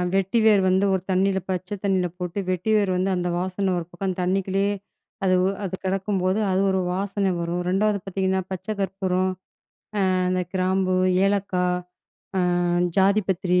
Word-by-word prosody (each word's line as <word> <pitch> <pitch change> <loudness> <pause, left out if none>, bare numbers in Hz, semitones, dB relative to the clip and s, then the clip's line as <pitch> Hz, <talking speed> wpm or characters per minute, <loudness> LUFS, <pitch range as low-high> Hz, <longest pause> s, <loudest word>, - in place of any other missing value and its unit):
வெட்டி 195 +4 +2
வேர் 210 -3 +6
வந்து 190 +2 +3
ஒரு 190 - 0
தண்ணில 190 +1 +2
பச்சை 185 +2 -2
தண்ணில 185 -2 +2
போட்டு, 180 +2 -4
வெட்டி 185 +4 -1
வேர் 200 -3 +1
வந்து 185 +1 +1
அந்த 180 0 -1
வாசன 185 +1 -1
ஒரு 170 - -6
பக்கம் 185 +1 -3
தண்ணிக்குள்ளயே 195 +2 +1 0.5
அது 185 - +3
உ - - +3 0.2
அது 190 -1 -3
கிடக்கும்போது, 190 0 0
அது 185 +1 +2
ஒரு 190 - +1
வாசனை 195 +1 -1
வரும். 170 +1 -2
2ஆவது 205 +2 +2
பாத்தீங்கன்னா, 190 0 0
பச்சை 190 +3 -3
கற்பூரம், 190 -1 0 0.8
அ - - +2 0.2
அந்த 185 0 +1
கிராம்பு, 185 0 +1 0.3
ஏலக்காய், 185 -3 +1 0.6
அ - - +3 0.6
ஜாதி 200 +2 +4
பத்திரி, 180 -1 +2
190 Hz, 155 wpm, -24 LUFS, 185-195 Hz, 0.8 s, வேர்